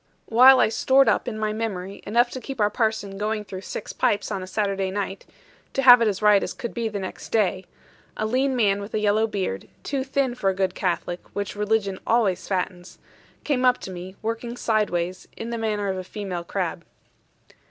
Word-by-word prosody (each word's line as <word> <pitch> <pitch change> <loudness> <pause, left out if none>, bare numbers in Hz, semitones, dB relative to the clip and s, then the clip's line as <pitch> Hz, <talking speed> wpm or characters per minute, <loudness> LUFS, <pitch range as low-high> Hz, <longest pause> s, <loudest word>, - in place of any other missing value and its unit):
While 255 +3 +7
I - - +4
stored 265 +4 +4
up, - - +2
in 225 -3 -3
my 215 0 -1
memory, 200 -3 -4
enough 240 +3 +3
to 260 - -6
keep 270 -2 -7
our 210 -1 +3
parson 215 -3 -1
going 210 0 -2
through 190 -1 -7
six - - -6
pipes 205 - 0
on 195 -2 -2
a 185 - -7
Saturday 195 -1 -1
night 195 0 -4 0.5
to 270 - 0
have 245 -2 +9
it 230 - +4
as 205 0 -2
right 210 -2 +6
as - - -3
could 235 - -5
be 230 -2 -2
next 200 -3 -6
day 195 -4 +1 0.5
a 215 - -1
lean 260 +4 +1
man 205 -4 +2
with 200 +2 -6
a - - +1
yellow 210 +1 +2
beard, 190 - -3 0.2
too 275 -2 -2
thin 270 -1 0
for 200 -5 0
a 190 - -1
good 190 -1 0
Catholic 175 -1 -2
(which 205 0 -3
religion 210 -2 0
always 220 -6 +2
fattens), 180 -1 -3 0.5
came 270 -4 0
up 250 -1 +5
to 190 - -7
me, 185 +1 -8
working 230 +2 -3
sideways, 185 -6 -1
in 230 +1 -5
the 235 - -2
manner 210 -2 -1
of 190 -1 -1
a - - -5
female 185 -3 -5
crab. 175 -1 -3
210 Hz, 205 wpm, -24 LUFS, 190-230 Hz, 0.5 s, have